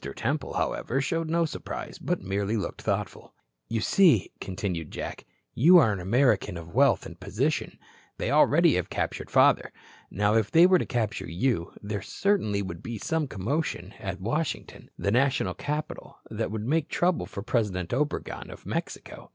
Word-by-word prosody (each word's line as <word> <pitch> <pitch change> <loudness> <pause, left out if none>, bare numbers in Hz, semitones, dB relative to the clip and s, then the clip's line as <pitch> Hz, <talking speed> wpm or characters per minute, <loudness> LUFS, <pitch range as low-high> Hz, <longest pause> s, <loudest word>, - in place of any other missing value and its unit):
Temple, 140 +5 -2
however, 130 - -1
showed 165 +4 -1
no 170 +1 +2
surprise, 155 - -6
but - - -2
merely 100 +3 -1
looked 100 - -4
thoughtful. - - -3 0.3
"You 115 -1 -1
see," 155 - +4
continued 90 -4 -4
Jack, - - -6 0.3
"you 170 +9 +7
are 115 -11 +5
an 100 - -4
American 105 -1 +2
of 85 0 -10
wealth 140 +4 +4
and 85 +1 -10
position. 110 +11 -1 0.4
They - - -2
already - - +5
have - - -2
captured - - -3
father. - - +4 0.4
Now, 105 +2 +1
if 110 -2 +2
they 165 +2 +7
were 185 0 +5
to - - -3
capture 115 -4 -2
you, 90 0 -1
there 105 -1 -3
certainly 105 - 0
would 85 -3 -7
be 115 -1 -5
some 160 +7 -1
commotion 110 - -3
at 95 -2 -5
Washington, 120 - -3
the 100 - 0
national 135 +4 +2
capital, 150 +1 -5
that - - -2
would 110 0 -4
make 150 +3 0
trouble 175 0 +1
for 100 - -7
President 105 -7 -1
Obregon 145 +3 -2
of - - -11
Mexico. - - -5
115 Hz, 165 wpm, -27 LUFS, 100-150 Hz, 0.4 s, you